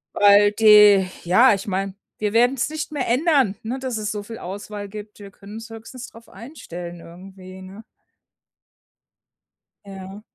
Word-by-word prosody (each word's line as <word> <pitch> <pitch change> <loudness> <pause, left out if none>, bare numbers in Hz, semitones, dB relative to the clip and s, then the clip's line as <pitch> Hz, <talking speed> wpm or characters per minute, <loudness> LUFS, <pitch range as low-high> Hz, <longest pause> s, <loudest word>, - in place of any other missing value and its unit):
Weil 205 0 +5
die 210 -3 +6 0.2
ja, 210 +8 +5
ich 195 +1 -5
meine, 195 0 -3 0.2
wir 210 0 -3
werden 245 +3 +3
es 265 - -2
nicht 310 0 -6
mehr 285 -4 -3
ändern, 260 - +2
ne, 245 +4 -4
dass 255 -4 -4
es 215 0 -3
so 205 -1 -5
viel 225 +2 -9
Auswahl 205 +2 -8
gibt. 210 0 -11
Wir 200 -1 -12
können 200 +1 -14
uns 225 +1 -9
höchstens 225 +3 -10
darauf 230 0 -17
einstellen 175 - -10
irgendwie, 185 +2 -13
ne? 195 +4 -12 2.0
Ja. 195 +1 -10
210 Hz, 155 wpm, -21 LUFS, 195-230 Hz, 2.0 s, die